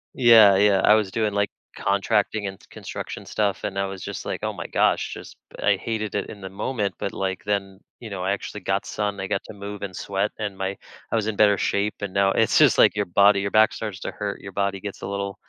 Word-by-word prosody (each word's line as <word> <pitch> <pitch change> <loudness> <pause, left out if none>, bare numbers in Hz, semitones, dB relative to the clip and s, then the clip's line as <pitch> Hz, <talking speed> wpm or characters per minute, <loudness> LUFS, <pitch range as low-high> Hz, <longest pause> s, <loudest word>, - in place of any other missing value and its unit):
Yeah, 115 -5 +7
yeah. 100 -1 +4
I 105 - +7
was 105 -3 +1
doing, 110 -2 0
like, 100 0 +1 0.3
contracting 100 +1 0
and 95 - -6
s - - -19
construction - - -7
stuff, 100 -2 -1
and 100 -1 -3
I 100 - +1
was 95 -1 -7
just - - -6
like, - - -4
"Oh - - 0
my - - -7
gosh," - - +1
just - - -10 0.3
I - - +3
hated 110 -3 -3
it 100 - -2
in 100 - -10
the 95 - -6
moment, 105 +1 -2
but, 100 - -3
like, 95 -1 -3
then, 100 -2 -2 0.2
you 115 - -8
know, 95 -2 -5
I 95 - 0
actually 105 +1 -6
got 95 +1 -1
sun, 100 -2 -3
I 95 - -3
got 100 -1 -1
to - - -9
move 100 0 -8
and 95 -3 -5
sweat, 100 +1 -2
and 100 -3 -4
my 95 +1 -3 0.3
I - - +1
was 110 -1 0
in 110 - -2
better 105 -2 +5
shape, 100 +1 0
and 100 -2 -4
now 100 0 +3
it's - - +2
just, - - +6
like, - - +6
your 105 -1 0
body 100 +3 +4
your 100 0 -2
back 110 0 +5
starts 105 -3 -6
to - - -4
hurt, 100 -1 -5
your 100 - -8
body 100 0 -1
gets 100 -2 -7
a - - -5
little 100 0 -4
100 Hz, 250 wpm, -24 LUFS, 95-105 Hz, 0.3 s, Yeah